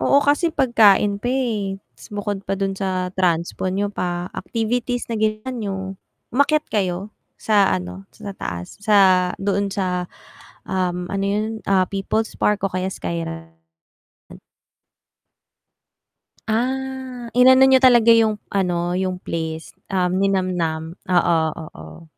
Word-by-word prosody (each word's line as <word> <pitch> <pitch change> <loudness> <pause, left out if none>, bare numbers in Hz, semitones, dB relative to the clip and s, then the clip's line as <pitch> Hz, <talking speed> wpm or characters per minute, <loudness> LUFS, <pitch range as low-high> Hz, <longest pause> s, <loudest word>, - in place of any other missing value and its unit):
Oo, 280 - +4
kasi 295 +4 +3
pagkain 210 -6 +4
pa 245 - -2
eh, 220 -7 -1 0.2
tas 120 - -14
bukod 205 -1 -4
pa 195 - -3
dun 195 0 -1
sa 185 -2 -2
transpo 175 0 0
niyo 200 +2 -1
pa, 175 -1 -3
activities 240 +2 -2
na 230 - -2
ginawa 215 +3 -1
niyo, 210 -5 -3 0.6
umakyat 295 +4 +2
kayo 190 -1 -1 0.3
sa 205 -3 +3
ano, 90 +1 -4
sa 200 +10 -8
taas 85 0 -6
sa 190 -4 +4
doon 200 0 0
sa, 180 -3 -1 0.6
um, 180 -1 -1
ano 195 0 -1
'yon 205 +2 0 0.2
ah 190 -1 +4
People's 200 +3 -2
Park 205 -2 +1
o 195 - -1
kaya 185 +1 -1
Sky 85 -1 -4
Ranch? 80 0 -9 2.9
Ah, 255 +1 -3
inano 260 +2 +7
niyo 265 -1 +6
talaga 240 -3 +6
yung 220 -2 +3 0.2
ano, 175 -3 0
yung 185 -1 -1
place, 160 -2 -5 0.2
um, 180 -2 0
ninamam, 180 -5 -1 0.2
oo, 175 -2 +3 0.2
oo. 155 - -11
195 Hz, 130 wpm, -21 LUFS, 180-225 Hz, 2.9 s, inano